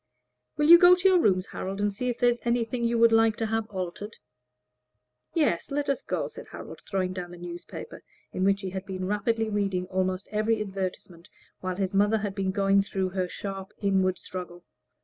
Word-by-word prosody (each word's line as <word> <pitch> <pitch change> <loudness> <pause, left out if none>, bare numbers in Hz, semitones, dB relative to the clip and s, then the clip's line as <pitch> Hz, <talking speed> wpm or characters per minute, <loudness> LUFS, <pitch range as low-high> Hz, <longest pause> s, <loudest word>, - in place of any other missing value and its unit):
"Will 295 0 +2
you 340 +1 +10
go 355 +1 +8
to 365 +1 +2
your 370 -2 +5
rooms, 185 - +2
Harold, 195 0 -5
and 205 0 0
see 250 +5 -2
if 240 - -2
there 245 0 +4
is 240 - -4
anything 235 0 0
you 235 0 +1
would 230 0 +6
like 225 -1 +4
to 225 - -2
have 225 0 -1
altered?" 190 +2 -6 1.2
"Yes, 290 - +1
let 285 0 -2
us 275 - 0
go," - - -2
said - - -11
Harold, - - -9
throwing 185 -2 -1
down 180 -1 -6
the 175 - -10
newspaper, 175 - -8 0.3
in 185 - -1
which 195 0 +2
he 190 -2 -4
had 190 0 -6
been 185 -1 -4
rapidly 220 +3 0
reading 200 -3 -1
almost 185 0 -1
every 215 +1 +1
advertisement 190 -3 -5 0.3
while 185 -1 -3
his 190 0 -2
mother 205 +3 +3
had 205 -2 -3
been 195 -1 -1
going 195 0 +3
through 190 -1 -2
her 185 -1 -2
sharp 195 +1 -6
inward 190 -2 +1
struggle. 175 -1 -8
200 Hz, 200 wpm, -27 LUFS, 185-225 Hz, 1.2 s, you